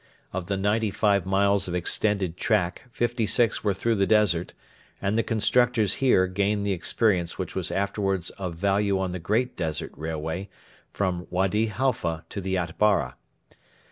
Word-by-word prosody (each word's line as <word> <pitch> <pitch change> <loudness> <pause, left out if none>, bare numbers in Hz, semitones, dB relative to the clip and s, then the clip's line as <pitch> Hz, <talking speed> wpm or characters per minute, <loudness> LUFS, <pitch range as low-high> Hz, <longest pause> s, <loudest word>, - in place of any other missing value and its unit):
Of 90 -1 -4
the 100 0 -1
ninety 105 +3 +1
five 100 -2 +1
miles 100 0 +2
of 90 - -3
extended 95 0 0
track, 90 +3 0
fifty 120 -1 -1
six 115 +2 +2
were 100 -2 +1
through 115 +4 0
the 100 -1 +2
desert, 105 -6 +2 0.5
and 100 +2 -1
the 115 - +3
constructors 115 0 +2
here 125 -8 +4
gained 100 +2 0
the 100 - 0
experience 90 -1 0
which - - -4
was - - -2
afterwards 95 -2 -1
of 90 -4 -6
value 100 +2 +1
on 95 -1 -1
the 90 - -4
great 110 +9 0
Desert 80 -3 -3
Railway 80 +4 -4 0.4
from 90 -3 -2
Wady 95 +5 +1
Halfa 105 -9 -1
to 100 - -5
the 95 0 -2
Atbara. 85 -5 +1
100 Hz, 160 wpm, -26 LUFS, 90-105 Hz, 0.5 s, here